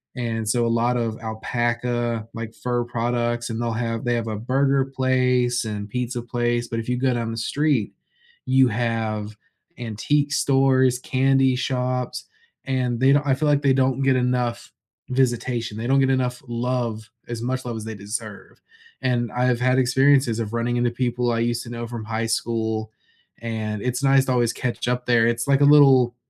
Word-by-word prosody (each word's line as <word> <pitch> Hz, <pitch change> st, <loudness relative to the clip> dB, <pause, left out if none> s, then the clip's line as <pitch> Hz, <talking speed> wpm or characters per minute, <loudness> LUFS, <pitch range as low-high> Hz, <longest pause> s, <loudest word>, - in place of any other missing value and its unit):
And 115 Hz, -3 st, -3 dB
so 115 Hz, +2 st, +1 dB
a 115 Hz, -, +1 dB
lot 125 Hz, 0 st, +1 dB
of 115 Hz, -2 st, -2 dB
alpaca, 120 Hz, +1 st, -2 dB
like, 115 Hz, 0 st, -6 dB
fur 120 Hz, -1 st, -2 dB
products, 120 Hz, 0 st, -2 dB
and 115 Hz, 0 st, -4 dB
they'll 120 Hz, -1 st, -1 dB
have 115 Hz, 0 st, -3 dB
they 120 Hz, -, +1 dB
have 115 Hz, -1 st, -2 dB
a 110 Hz, -2 st, -3 dB
burger 135 Hz, +3 st, +1 dB
place 125 Hz, -2 st, +1 dB
and 105 Hz, -1 st, -5 dB
pizza 125 Hz, +1 st, -3 dB
place, 120 Hz, 0 st, -1 dB
but 115 Hz, -, -3 dB
if 115 Hz, -, -6 dB
you 125 Hz, -, 0 dB
go 130 Hz, +1 st, +1 dB
down 115 Hz, -1 st, -2 dB
the 115 Hz, -, -5 dB
street, 140 Hz, -2 st, 0 dB, 0.5 s
you 130 Hz, 0 st, +4 dB
have 110 Hz, -2 st, -2 dB, 0.4 s
antique 140 Hz, +6 st, -1 dB
stores, 130 Hz, -3 st, +3 dB
candy 135 Hz, 0 st, +2 dB
shops, 125 Hz, -1 st, -2 dB, 0.4 s
and 125 Hz, -3 st, -1 dB
they 130 Hz, +2 st, +4 dB
don't 145 Hz, 0 st, +2 dB
I 135 Hz, -, +4 dB
feel 150 Hz, +3 st, 0 dB
like 145 Hz, -1 st, +3 dB
they 135 Hz, -1 st, +4 dB
don't 130 Hz, 0 st, +1 dB
get 135 Hz, -1 st, +3 dB
enough 125 Hz, -1 st, -1 dB, 0.4 s
visitation. 120 Hz, -3 st, 0 dB
They 115 Hz, +2 st, -4 dB
don't 135 Hz, +1 st, +3 dB
get 135 Hz, -1 st, +3 dB
enough 125 Hz, -1 st, -1 dB
love, 120 Hz, -2 st, -2 dB, 0.2 s
as 115 Hz, -1 st, -5 dB
much 130 Hz, +1 st, -3 dB
love 120 Hz, -2 st, -4 dB
as 110 Hz, -, -6 dB
they 110 Hz, -1 st, -6 dB
deserve. 100 Hz, +2 st, -7 dB, 0.4 s
And 120 Hz, -3 st, 0 dB
I've 125 Hz, -1 st, +1 dB
had 130 Hz, +1 st, +2 dB
experiences 130 Hz, -1 st, +3 dB
of 115 Hz, 0 st, -4 dB
running 120 Hz, +1 st, -1 dB
into 120 Hz, 0 st, +1 dB
people 120 Hz, 0 st, -1 dB
I 115 Hz, -, 0 dB
used 120 Hz, 0 st, -1 dB
to 115 Hz, -, -10 dB
know 120 Hz, 0 st, -5 dB
from 115 Hz, -2 st, -6 dB
high 115 Hz, +1 st, -2 dB
school, 110 Hz, -1 st, -2 dB, 0.5 s
and 110 Hz, -2 st, -4 dB
it's 125 Hz, +1 st, -2 dB
nice 135 Hz, 0 st, +4 dB
to 130 Hz, -, -1 dB
always 120 Hz, -2 st, +2 dB
catch 120 Hz, -1 st, -3 dB
up 125 Hz, 0 st, -1 dB
there. 115 Hz, -2 st, +3 dB
It's 120 Hz, 0 st, 0 dB
like 140 Hz, -1 st, +4 dB
a -, -, +7 dB
little 135 Hz, -4 st, +6 dB
120 Hz, 185 wpm, -23 LUFS, 115-130 Hz, 0.5 s, a